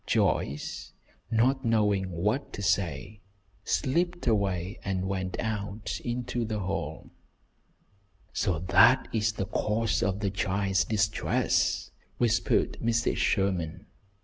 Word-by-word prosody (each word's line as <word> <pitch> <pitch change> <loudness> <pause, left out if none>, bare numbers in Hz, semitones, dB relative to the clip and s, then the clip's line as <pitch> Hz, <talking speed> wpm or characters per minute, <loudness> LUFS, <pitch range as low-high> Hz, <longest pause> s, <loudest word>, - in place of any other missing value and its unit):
Joyce, 70 +2 0 0.4
not 130 +4 +2
knowing 105 -4 +2
what 105 +11 -1
to 100 - -5
say, 95 +1 -1 0.4
slipped 175 +3 0
away 100 -5 0
and 95 -1 -1
went 95 -1 -3
out 105 -1 -3
into 120 0 -2
the 110 -1 -2
hall. 90 -5 -4 1.2
"So 95 -6 0
that 100 +9 +5
is 110 -1 +1
the 95 - -3
cause 110 +2 0
of 100 -3 0
the 100 -2 0
child's 95 -1 +1
distress," 105 -3 +1 0.3
whispered 120 -3 +1
Mrs. 115 0 +1
Sherman. 95 -5 0
100 Hz, 110 wpm, -28 LUFS, 95-115 Hz, 1.2 s, that